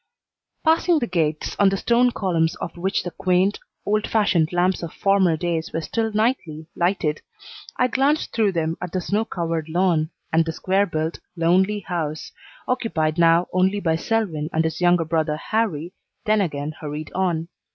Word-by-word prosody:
Passing 330 +1 +3
the 260 - 0
gates, 160 -6 -1
on 200 - +6
the 195 - -1
stone 240 +4 +3
columns 170 -8 0
of - - -6
which 190 +3 -1
the 175 - -5
quaint, 185 +3 +1 0.3
old 210 +1 +1
fashioned 180 -7 +2
lamps 180 +1 +1
of 170 -2 -5
former 195 -5 +2
days 165 -1 -2
were 165 - -2
still 225 +7 -2
nightly 210 -8 -1
lighted, 170 -4 0 0.6
I 250 - +3
glanced 275 +5 +1
through 215 -4 +2
them 165 -1 -1
at 180 - -5
the 185 - 0
snow 205 +5 -1
covered 165 -5 -3
lawn 170 -2 +1 0.2
and 165 +1 +5
the 165 0 -4
square 195 +4 +1
built, 160 0 -3 0.2
lonely 185 +5 +2
house, 160 -4 -4 0.4
occupied 165 -10 0
now 170 +1 +5
only 190 +2 +2
by 165 -4 +1
Selwyn 165 -5 -1
and 160 - +1
his 160 +2 -3
younger 175 -1 +4
brother 155 -1 0
Harrie, 185 -4 -2 0.3
then 215 0 +3
again 150 -4 -2
hurried 150 0 -6
on. 175 -3 -1
175 Hz, 170 wpm, -22 LUFS, 160-205 Hz, 0.6 s, on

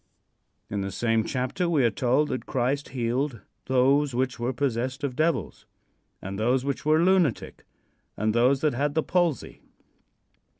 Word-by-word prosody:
In 100 -1 -3
the 95 0 -3
same 115 0 +1
chapter 130 - -2
we 150 -6 +2
are 115 - +3
told 130 +7 +1
that 130 - -4
Christ 135 +3 -1
healed 125 0 -2 0.2
"those 135 +1 +2
which 130 0 -1
were 120 +2 -1
possessed 130 +1 -2
of 135 -3 -2
devils, 155 - -1 0.6
and 95 +1 -5
those 125 +4 +1
which 140 -1 -3
were 155 +2 +3
lunatic, 180 - +1 0.5
and 110 +1 0
those 125 +4 +3
that 150 -3 +2
had 145 +4 -1
the 160 - +2
palsy." 175 -5 -1
130 Hz, 155 wpm, -26 LUFS, 120-145 Hz, 0.6 s, are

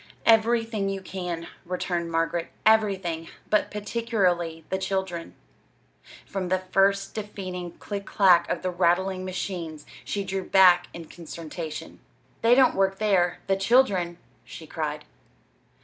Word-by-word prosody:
"Everything 225 -2 +3
you 195 0 -3
can," 180 -3 -5 0.2
returned 175 -1 -3
Margaret; 165 +1 0 0.2
"everything! 195 -7 +2 0.2
But 210 - +3
particularly 195 -7 -1
the 190 - -1
children." 190 -3 -3 0.9
From 190 -2 -4
the 185 - +3
first 195 +1 +1
deafening 185 -5 -6
click 200 -1 -6
clack 180 -4 +4
of 175 - -2
the 185 - -1
rattling 185 +2 +1
machines 175 -4 -5 0.2
she 200 - -3
drew 190 0 -3
back 180 -2 +5
in 170 -1 -9
consternation. 160 -1 -8 0.4
"They 230 +2 +5
don't 260 -1 +5
work 195 0 +1
there 190 -5 +1
the 195 - +2
children!" 195 -5 +2 0.3
she - - -10
cried. - - -4
190 Hz, 125 wpm, -26 LUFS, 175-200 Hz, 0.9 s, back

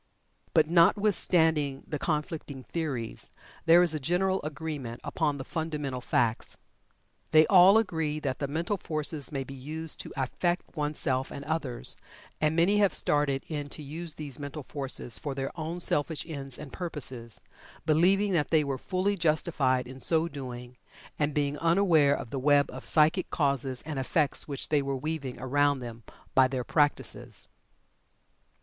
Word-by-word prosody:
But, 155 -2 +5
notwithstanding 170 -5 +3
the 150 - -4
conflicting 150 -3 -3
theories, 135 -9 -4 0.4
there 170 +2 +7
is 170 -3 +4
a 155 - -2
general 185 +6 +1
agreement 145 -6 -5
upon 150 -4 -1
the 135 - -6
fundamental 150 -5 -3
facts. 115 -2 0 0.7
They 155 0 +6
all 190 +3 +7
agree 160 -8 0
that 135 -3 -3
the 140 - -1
mental 165 +8 -2
forces 155 -4 -2
may 135 -2 -2
be 135 - -10
used 155 +4 -4
to - - -7
affect 175 +8 -2
oneself 145 -3 -1
and 140 - -8
others, 140 -7 -3 0.4
and 155 +1 +2
many 185 +5 +3
have 200 -2 +3
started 145 -2 +1
in 145 -2 -4
to 150 - -7
use 160 +3 -6
these 145 -4 -6
mental 145 +1 -6
forces 135 -3 +2
for 145 -4 -4
their 135 0 -3
own 165 +1 -5
selfish 155 -2 -1
ends 140 -5 -5
and 145 -4 -10
purposes, 130 - -2 0.5
believing 185 +6 +3
that 160 -5 +1
they 160 -2 +4
were 135 -2 -3
fully 195 +2 0
justified 150 -6 +1
in 130 +1 -10
so 160 +3 +3
doing, 125 -4 -8 0.4
and 150 0 +1
being 145 0 0
unaware 165 -4 +4
of 115 - -7
the 135 - -2
web 145 +1 +3
of 130 +1 -9
psychic 160 +4 +3
causes 140 -4 +1
and 155 -3 -4
effects 145 +2 +1
which 140 -2 -2
they 150 -2 +3
were 135 -1 -2
weaving 140 -2 -4
around 145 +2 +2
them 120 -2 -8 0.3
by 130 -1 +6
their 130 -1 -3
practices. 145 +2 0
150 Hz, 155 wpm, -28 LUFS, 135-165 Hz, 0.7 s, there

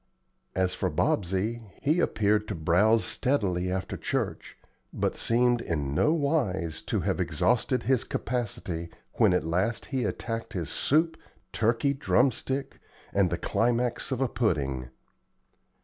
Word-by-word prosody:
As 95 -1 +1
for - - -1
Bobsey, 100 +6 0 0.2
he 155 +4 +2
appeared 105 -7 +2
to 105 - -3
browse 95 +8 +3
steadily 95 -10 0
after 95 0 -3
church, - - -3 0.3
but - - -1
seemed 120 +1 +2
in 70 -4 -2
no 150 - +3
wise 135 - 0
to - - 0
have - - -1
exhausted 125 +1 +1
his 130 -3 +2
capacity 95 -8 -3 0.3
when 110 -5 +6
at 90 - +1
last 95 +8 0
he 130 -2 +1
attacked 115 +1 -3
his 85 -7 -3
soup, 160 +3 +2 0.4
turkey 115 +5 +2
drum 135 -1 +3
stick, 135 +2 -4 0.3
and 100 -2 +3
the 85 - -1
climax 120 +8 0
of 130 0 -1
a 135 - +3
pudding. 70 - -1
110 Hz, 135 wpm, -28 LUFS, 90-125 Hz, 0.4 s, when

